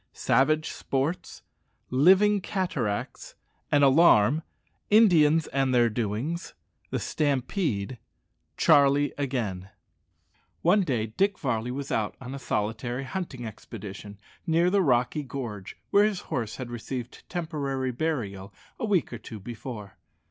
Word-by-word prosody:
Savage 155 +6 +2
sports 145 +7 -3 0.5
Living 190 +9 +5
cataracts 145 - -3 0.4
An 145 -1 +4
alarm 140 -2 +5 0.5
Indians 165 -8 +5
and 135 -2 +1
their 120 -1 +4
doings 120 - -3 0.3
The - - -1
stampede 130 - -1 0.6
Charlie 145 -2 +4
again. 115 -10 -3 0.9
One 185 +5 +5
day 125 - 0
Dick 195 - 0
Varley 120 -4 -2
was 140 +2 -5
out 105 -2 -1
on 130 0 -7
a 140 - -6
solitary 120 +3 -2
hunting 135 -4 -5
expedition 105 -2 -9 0.3
near 170 +2 +3
the 200 0 +3
rocky 125 -1 +2
gorge 120 -8 -6
where 205 +1 +6
his 210 -4 -1
horse 115 -3 -2
had 125 -2 -7
received 120 +1 -6
temporary 140 -7 -2
burial 115 -9 -3 0.3
a - - -1
week 195 -6 +1
or - - -6
two 110 - -9
before. 105 -2 -8
135 Hz, 120 wpm, -27 LUFS, 115-160 Hz, 0.9 s, where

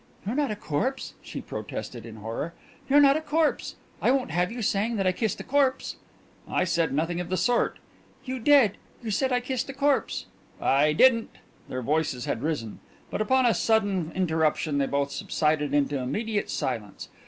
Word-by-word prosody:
"You're 210 - -1
not 285 0 +1
a 215 - -2
corpse!" 230 - -2
she - - -7
protested 120 -2 -6
in 110 - -9
horror. 115 +10 -5 0.3
"You're 285 +2 +6
not 280 0 +6
a - - -3
corpse! 310 0 0 0.3
I - - +3
won't 260 -7 +1
have 175 +4 +1
you 235 -1 -4
saying 210 +4 +1
that 195 -2 0
I 185 - +4
kissed 210 +2 -2
a - - -5
corpse!" 275 -1 +1 0.5
"I - - +1
said 170 -2 +1
nothing 165 +4 -1
of 180 - -6
the 185 - 0
sort!" 245 +3 +1 0.5
"You 260 -1 -3
did! 250 -5 +5 0.3
You 220 - -3
said 260 +6 +1
I 250 0 +2
kissed 255 +1 -3
a - - -4
corpse!" 280 0 +1 0.3
"I 145 +3 +3
didn't!" 230 +6 +5 0.4
Their 130 0 -4
voices 145 -2 0
had 115 - -2
risen, 140 -8 -3 0.3
but - - -2
upon 260 +4 +3
a 235 - +5
sudden 200 -8 +1
interruption 160 -4 +1
they 135 - +1
both 140 0 0
subsided 150 -2 0
into 145 -1 +1
immediate 205 - -2
silence. 105 -6 -4
190 Hz, 185 wpm, -26 LUFS, -, 0.5 s, You're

